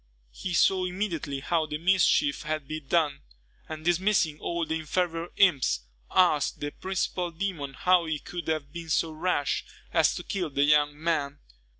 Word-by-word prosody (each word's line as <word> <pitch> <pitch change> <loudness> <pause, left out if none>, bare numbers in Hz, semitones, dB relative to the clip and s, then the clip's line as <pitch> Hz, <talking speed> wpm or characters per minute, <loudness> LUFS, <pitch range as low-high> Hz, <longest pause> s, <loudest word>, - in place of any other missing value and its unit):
He 175 - -4
saw 185 +1 +3
immediately 175 -7 -3
how 160 +1 0
the 150 - -3
mischief 190 - +3
had 155 -2 -3
been 155 -2 -6
done; 150 -3 +1 0.5
and 155 0 -7
dismissing 175 -3 +2
all 170 -1 -2
the 160 +1 -2
inferior 165 +1 -1
imps, 140 - +3 0.3
asked 175 -6 +3
the 145 0 -3
principal 185 -1 -2
demon 165 -6 -4
how 180 -2 +3
he 160 -1 -1
could 175 +4 -7
have 155 -3 -2
been 170 -1 -7
so 160 +1 +1
rash 155 -3 0 0.3
as 160 -2 +3
to 175 - -5
kill 180 -4 -2
the 140 0 +1
young 145 0 +3
man. 150 -3 -1
160 Hz, 165 wpm, -27 LUFS, 150-180 Hz, 0.5 s, saw